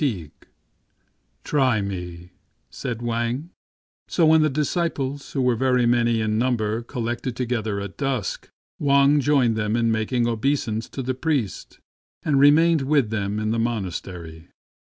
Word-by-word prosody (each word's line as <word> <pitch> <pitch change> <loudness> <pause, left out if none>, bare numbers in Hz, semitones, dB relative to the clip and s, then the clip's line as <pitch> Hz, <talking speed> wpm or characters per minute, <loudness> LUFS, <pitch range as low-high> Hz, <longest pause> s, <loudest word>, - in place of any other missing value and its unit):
C - - +3
J - - +1
i8 80 -5 -10 1.1
STRANGE 100 - -1 0.4
STORIES 120 - -2 0.7
So 170 - +2
when 160 0 +6
the 155 - +3
disciples, 145 -2 -2
who 135 - 0
were 125 -1 +3
very 125 0 +2
many 120 -1 +2
in 110 0 0
number, 115 -3 0
collected 120 0 -4
together 115 -5 -2
at 100 -1 -7
dusk, 135 -7 -2 0.3
Wang 140 +1 +4
joined 135 -5 +2
them 105 0 -1
in 115 -1 +2
making 110 +2 0
obeisance 115 -1 -1
to 135 - -5
the 130 +1 -1
priest, 130 -6 -2 0.5
and 140 -3 +2
remained 155 +3 +5
with 135 -5 +1
them 105 -1 -2
in 110 0 -1
the 115 - 0
monastery. 90 -7 -4
120 Hz, 140 wpm, -23 LUFS, 110-135 Hz, 1.1 s, when